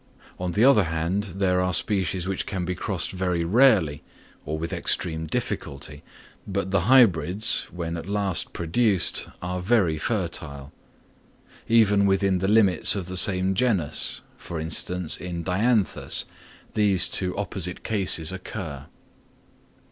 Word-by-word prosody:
On 90 Hz, -1 st, -3 dB
the 110 Hz, +7 st, +3 dB
other 130 Hz, -8 st, +5 dB
hand, 85 Hz, +5 st, -2 dB
there 90 Hz, -2 st, +1 dB
are 90 Hz, -1 st, +1 dB
species 95 Hz, -3 st, 0 dB
which 95 Hz, -1 st, -2 dB
can 95 Hz, -3 st, -3 dB
be 90 Hz, -, -2 dB
crossed 90 Hz, -1 st, -3 dB
very 90 Hz, -2 st, -1 dB
rarely, 95 Hz, -, +3 dB, 0.5 s
or 80 Hz, +1 st, -2 dB
with 85 Hz, +1 st, -4 dB
extreme 80 Hz, -2 st, -2 dB
difficulty, 70 Hz, 0 st, -5 dB, 0.5 s
but 100 Hz, -1 st, -3 dB
the 100 Hz, +2 st, +1 dB
hybrids, 100 Hz, -, +3 dB
when 85 Hz, -1 st, -4 dB
at 85 Hz, +3 st, -7 dB
last 100 Hz, -3 st, -2 dB
produced, 95 Hz, +3 st, 0 dB, 0.2 s
are 90 Hz, 0 st, -3 dB
very 90 Hz, -5 st, +1 dB
fertile. 80 Hz, -, -4 dB, 0.9 s
Even 105 Hz, -3 st, +4 dB
within 95 Hz, -1 st, +2 dB
the 95 Hz, -, -1 dB
limits 105 Hz, -3 st, +4 dB
of 95 Hz, -3 st, -3 dB
the 90 Hz, +1 st, -6 dB
same 95 Hz, +1 st, +3 dB
genus, 95 Hz, -8 st, 0 dB, 0.2 s
for 85 Hz, -, -7 dB
instance 80 Hz, +2 st, -2 dB
in 85 Hz, -2 st, -5 dB
Dianthus, 105 Hz, +3 st, +1 dB, 0.5 s
these 100 Hz, -4 st, +3 dB
two 90 Hz, -1 st, -2 dB
opposite 95 Hz, -3 st, -4 dB
cases 95 Hz, -7 st, +1 dB
occur. 80 Hz, -6 st, -7 dB
90 Hz, 135 wpm, -24 LUFS, 85-100 Hz, 0.9 s, other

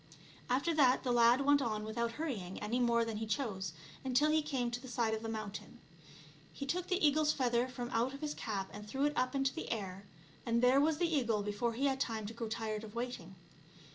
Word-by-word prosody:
After 275 Hz, +7 st, +2 dB
that 265 Hz, -4 st, +4 dB
the 250 Hz, -, 0 dB
lad 240 Hz, +2 st, +5 dB
went 285 Hz, 0 st, +4 dB
on 215 Hz, -4 st, -1 dB
without 230 Hz, +2 st, -2 dB
hurrying 230 Hz, -, -4 dB
any 220 Hz, +4 st, -1 dB
more 235 Hz, -1 st, +3 dB
than 225 Hz, -2 st, -3 dB
he 220 Hz, +1 st, -3 dB
chose, 205 Hz, -, -2 dB, 0.3 s
until 265 Hz, +4 st, +3 dB
he 315 Hz, 0 st, +3 dB
came 265 Hz, -5 st, -1 dB
to 240 Hz, -, -3 dB
the 260 Hz, -, -10 dB
side 235 Hz, -3 st, 0 dB
of 220 Hz, -, -2 dB
the 225 Hz, -, -4 dB
mountain. 215 Hz, -2 st, -6 dB, 0.7 s
He 280 Hz, -, -6 dB
took 355 Hz, +6 st, -2 dB
the 365 Hz, -4 st, +3 dB
eagle's 300 Hz, +1 st, +3 dB
feather 245 Hz, -2 st, +1 dB
from 245 Hz, -1 st, -6 dB
out 240 Hz, +4 st, +1 dB
his 295 Hz, +2 st, -4 dB
cap 195 Hz, -3 st, -4 dB
and 210 Hz, +1 st, -8 dB
threw 270 Hz, +6 st, 0 dB
it 295 Hz, -, +1 dB
up 255 Hz, +2 st, 0 dB
in 270 Hz, -, +2 dB
the 270 Hz, +5 st, -2 dB
air, 195 Hz, -3 st, -4 dB, 0.4 s
and 235 Hz, 0 st, +1 dB
there 260 Hz, +3 st, +6 dB
was 310 Hz, +1 st, +2 dB
the 345 Hz, -, +2 dB
eagle 230 Hz, -6 st, +1 dB
before 210 Hz, +3 st, -1 dB
he 260 Hz, +5 st, -1 dB
had 270 Hz, -1 st, +1 dB
time 225 Hz, -5 st, -2 dB
to 215 Hz, -, -6 dB
grow 230 Hz, 0 st, -4 dB
tired 220 Hz, -1 st, -3 dB
of 215 Hz, 0 st, -10 dB
waiting. 235 Hz, -7 st, -5 dB
240 Hz, 225 wpm, -34 LUFS, 220-275 Hz, 0.7 s, there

